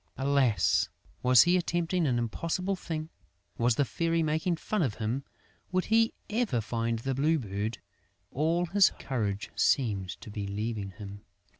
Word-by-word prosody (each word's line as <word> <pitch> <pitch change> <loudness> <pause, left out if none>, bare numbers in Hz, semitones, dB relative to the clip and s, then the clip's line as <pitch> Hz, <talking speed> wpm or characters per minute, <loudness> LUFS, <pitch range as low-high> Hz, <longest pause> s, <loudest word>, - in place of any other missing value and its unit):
Alas, 135 -5 +2 0.3
was 125 -1 +7
he 175 +1 +3
attempting 175 -1 0
an 125 -3 +1
impossible 165 - -1
thing? 160 -3 -5 0.5
Was 120 0 +3
the 140 - +2
Fairy 165 +4 0
making 160 +3 0
fun 210 +4 -2
of 130 -10 0
him? 115 +5 -2 0.5
Would 185 0 +1
he 225 +1 +3 0.2
ever 220 - 0
find 115 +1 -1
the 135 +4 -2
Blue 150 +5 +2
Bird? 105 -2 -3 0.5
All 165 +5 +1
his 195 +2 +4
courage 105 -6 -3
seemed 100 -8 +1
to 105 - -9
be 100 -1 -4
leaving 105 0 -3
him.... 100 +2 -9
135 Hz, 150 wpm, -29 LUFS, 110-170 Hz, 0.5 s, was